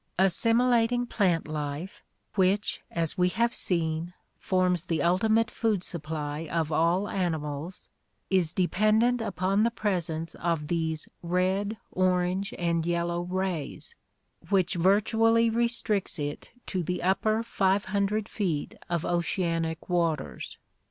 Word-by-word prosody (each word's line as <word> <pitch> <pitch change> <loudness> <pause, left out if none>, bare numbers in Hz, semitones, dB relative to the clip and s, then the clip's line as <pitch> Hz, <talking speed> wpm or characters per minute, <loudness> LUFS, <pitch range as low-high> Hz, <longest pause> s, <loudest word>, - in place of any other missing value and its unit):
Assimilating 230 +5 +3
plant 185 -9 +1
life, 150 +4 -5 0.3
which, 195 +2 +1
as 165 +1 -1
we 180 0 +4
have 235 +5 +1
seen, 170 0 0 0.2
forms 185 -2 +1
the 165 -3 0
ulti 180 +7 +2
mate 225 +1 +3
food 215 -5 0
supply 155 -2 -4
of 165 -2 0
all 170 +6 +2
animals, 160 -2 -3 0.4
is 180 -4 +3
dependent 215 +7 +2
upon 195 -1 0
the 230 - +4
presence 170 -8 -2
of 165 -3 -2
these 160 -2 -1
red, 185 +5 0
orange, 185 +1 +1
and 170 -1 0
yellow 170 0 -1
rays, 185 - -3 0.6
which 190 -3 +2
virtually 225 +5 +3
restricts 235 -3 0
it 145 -1 -5 0.2
to 185 - -2
the 180 +1 -3
upper 215 +4 +2
500 200 0 0
feet 175 -11 -2 0.2
of 170 -2 -1
oceanic 165 -2 -1
waters. 165 - -1
180 Hz, 120 wpm, -28 LUFS, 165-205 Hz, 0.6 s, we